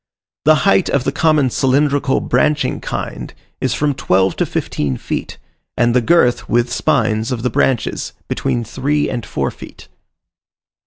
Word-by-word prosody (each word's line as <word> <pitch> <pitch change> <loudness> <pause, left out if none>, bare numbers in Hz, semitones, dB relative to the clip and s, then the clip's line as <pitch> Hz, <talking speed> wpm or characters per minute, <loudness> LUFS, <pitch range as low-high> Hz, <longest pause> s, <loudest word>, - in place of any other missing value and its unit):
The 155 +1 +6
height 195 -2 +3
of 140 - +1
the 135 - 0
common 150 -3 +2
cylindrical, 140 +1 +1
branching 150 -1 +1
kind, - - -5 0.3
is - - -1
from 150 -1 0
twelve 95 -8 +1
to - - 0
fifteen 70 -4 -2
feet, - - -5 0.4
and 120 0 +3
the 125 - +4
girth 125 -3 +2
(with 120 0 +1
spines) 115 -5 +1
of 120 -2 -3
the 125 - 0
branches 130 -4 0 0.2
between 120 - -1
three 145 +6 -1
and 120 -3 -3
four - - -2
feet. - - -13
130 Hz, 150 wpm, -17 LUFS, 120-145 Hz, 0.4 s, The